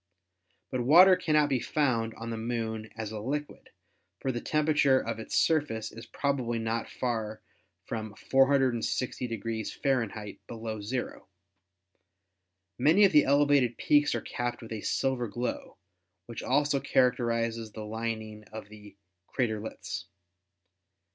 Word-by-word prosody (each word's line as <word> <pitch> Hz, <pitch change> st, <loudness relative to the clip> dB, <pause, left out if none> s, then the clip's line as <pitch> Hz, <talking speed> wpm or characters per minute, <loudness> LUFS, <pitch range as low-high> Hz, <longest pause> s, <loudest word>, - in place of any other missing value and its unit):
But 130 Hz, -, -1 dB
water 175 Hz, +9 st, +8 dB
cannot 155 Hz, -4 st, +2 dB
be 135 Hz, -2 st, +1 dB
found 115 Hz, -6 st, 0 dB
on 115 Hz, +1 st, -6 dB
the -, -, -2 dB
Moon 110 Hz, -1 st, -3 dB
as 110 Hz, -1 st, -4 dB
a 110 Hz, -, -5 dB
liquid, 145 Hz, +7 st, -4 dB, 0.5 s
for 135 Hz, -, -1 dB
the 120 Hz, -2 st, -4 dB
temperature 150 Hz, -3 st, +3 dB
of 115 Hz, -2 st, -4 dB
its 110 Hz, -, -3 dB
surface 145 Hz, -9 st, +1 dB
is 115 Hz, +1 st, -11 dB
probably 130 Hz, -5 st, -1 dB
not 115 Hz, +1 st, -2 dB
far 110 Hz, -3 st, -3 dB, 0.4 s
from 110 Hz, -2 st, -5 dB
460 125 Hz, -4 st, +1 dB
F. 110 Hz, -6 st, -2 dB
below 110 Hz, -2 st, -5 dB
zero. 120 Hz, +5 st, -4 dB, 1.5 s
Many 165 Hz, +10 st, +6 dB
of 195 Hz, -, +4 dB
the 150 Hz, -, +6 dB
elevated 140 Hz, -4 st, +3 dB
peaks 145 Hz, 0 st, +3 dB
are -, -, -2 dB
capped 120 Hz, -1 st, -4 dB
with 115 Hz, -, -10 dB
a 110 Hz, -2 st, -4 dB
silver 130 Hz, -3 st, 0 dB
glow, 120 Hz, +4 st, -4 dB, 0.5 s
which -, -, -7 dB
also 145 Hz, -1 st, +2 dB
characterizes 115 Hz, -4 st, +1 dB
the 110 Hz, 0 st, -7 dB
lining 110 Hz, -1 st, -4 dB
of 110 Hz, -1 st, -9 dB
the 105 Hz, -1 st, -14 dB, 0.3 s
"craterlets." 105 Hz, -6 st, -3 dB
120 Hz, 130 wpm, -29 LUFS, 110-135 Hz, 1.5 s, water